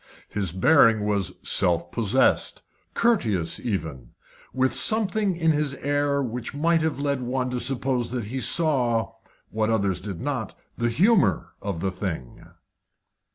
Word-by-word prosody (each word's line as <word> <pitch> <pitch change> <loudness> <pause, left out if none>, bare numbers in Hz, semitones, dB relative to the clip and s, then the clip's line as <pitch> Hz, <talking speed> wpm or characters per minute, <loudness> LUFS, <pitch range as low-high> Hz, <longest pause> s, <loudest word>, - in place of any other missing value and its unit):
His 100 -5 -2
bearing 110 - +4
was 100 -3 0
self 85 -3 +2
possessed, 115 +3 +1 0.3
courteous 110 - +1
even, 90 - -3
yet - - -20 0.4
with 130 0 +1
something 215 -3 +1
in 165 -1 +2
his 150 -2 0
air 145 0 0
which 125 +2 -5
might 165 +2 +2
have 160 -2 -1
led 140 -2 -1
one 125 +1 -2
to 125 - -2
suppose 130 -1 -1
that 120 -3 -4
he 130 +6 -4
saw 125 -10 +1 0.4
what 110 0 0
others 100 -5 0
did 95 -3 -6
not 130 -6 -3 0.2
the 120 -1 0
humour 190 - +2
of 100 -5 -4
the 95 - -1
thing. 90 - -6
125 Hz, 145 wpm, -24 LUFS, 100-145 Hz, 0.4 s, bearing